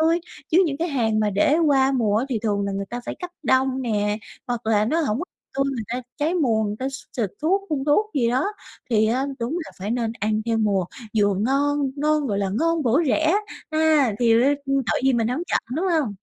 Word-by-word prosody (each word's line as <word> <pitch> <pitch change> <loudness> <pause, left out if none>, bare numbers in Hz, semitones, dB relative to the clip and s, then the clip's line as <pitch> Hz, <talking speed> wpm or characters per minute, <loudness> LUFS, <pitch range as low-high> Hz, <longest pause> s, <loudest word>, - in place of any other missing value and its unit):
tươi. 330 +2 +3 0.3
Chứ 355 +4 +5
những 280 -3 -2
cái 335 +4 -1
hàng 225 -7 +1
mà 210 -1 +1
để 245 +10 +3
qua 270 -2 +4
mùa 220 -6 +1
á 230 - +1
thì 245 -5 -1
thường 205 -2 0
là 200 - -2
người 195 0 -3
ta 245 - -4
phải - - -3
cấp 360 - -5
đông 265 -1 +2
nè, 210 -3 0 0.3
hoặc 240 -2 -3
là 215 -1 +3
nó 315 +9 +1
hổng 245 -8 0
có 350 - -3 0.3
tươi, 275 0 +1
người 235 - -3
ta 250 +1 -3
trái 315 +4 0
mùa, 235 -10 +2
người 210 0 -3
ta 260 - -2
x - - -8 0.2
xịt 220 -6 0
thuốc, 380 +6 +2
phun 280 -3 -1
thuốc 420 +9 +2
gì 235 -4 +2
đó 260 +8 +1 0.4
thì 220 -2 +3
á 255 +5 +1
đúng 235 +4 -3
là - - -11
phải 195 +3 -4
nên 230 -1 -1
ăn 215 +1 0
theo 225 -1 +1
mùa, 200 -4 +1 0.3
vừa 205 -1 +3
ngon 275 +6 +1
ngon, 300 0 +1
gọi 205 -5 -1
là, 195 -1 0
ngon 330 -1 +1
bổ 250 +3 +3
rẻ, 315 +4 +2 0.4
ha! 310 -6 +3
Thì 230 -2 +4
r 230 - +5 0.3
tội 270 -7 0
gì 270 - +4
mình 230 -2 +1
hổng 255 +7 -2
chọn, - - +2 0.2
đúng 365 +4 0
hông? 305 - +1
255 Hz, 240 wpm, -23 LUFS, 220-295 Hz, 0.4 s, Chứ